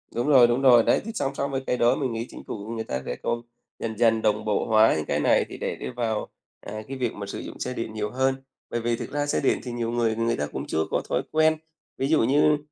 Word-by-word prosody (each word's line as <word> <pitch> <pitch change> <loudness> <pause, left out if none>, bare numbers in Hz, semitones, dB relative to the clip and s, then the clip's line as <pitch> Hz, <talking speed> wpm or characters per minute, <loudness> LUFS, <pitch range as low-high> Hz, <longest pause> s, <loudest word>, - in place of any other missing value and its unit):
Đúng 120 +4 0
rồi, 130 -5 +7
đúng 120 +2 +1
rồi. 125 -4 +7
Đấy, - - +3
thì 225 - -4
song 135 -6 -1
song 140 0 -2
với 135 -1 -1
cái 125 - +1
đó 120 +1 +4
mình 130 -4 -2
nghĩ 115 +1 -3
Chính - - -10
phủ 105 -1 -6
người 110 - -3
ta 65 -10 -3
sẽ - - -3
cố 120 0 -1 0.4
dần 110 -1 -4
dần 115 -1 +3
đồng 105 -1 +1
bộ 105 -1 +1
hóa 110 0 +5
những 75 - -2
cái - - 0
này - - +3
thì - - -8
để - - -3
đi - - -6
vào, 115 -3 -2 0.3
à, 110 +1 -6
cái 135 - -5
việc 125 -3 -1
mà 100 - -6
sử 100 - -6
dụng - - -8
xe 125 - -3
điện 115 -3 -4
nhiều 105 -1 -2
hơn, 130 +1 +1 0.3
bởi 120 - -2
vì 120 +1 0
thực - - -7
ra 145 0 -1
xe 145 - 0
điện - - +2
thì 125 - -5
nhiều 120 -1 -2
người 115 -2 +1
người 115 +1 0
ta 75 - -1
cũng - - -5
chưa 80 - -1
có - - +1
thói - - +1
quen. 155 0 +3 0.4
Ví 135 - 0
dụ 155 -4 +3
như, 145 +4 +4
120 Hz, 285 wpm, -25 LUFS, 110-135 Hz, 0.4 s, rồi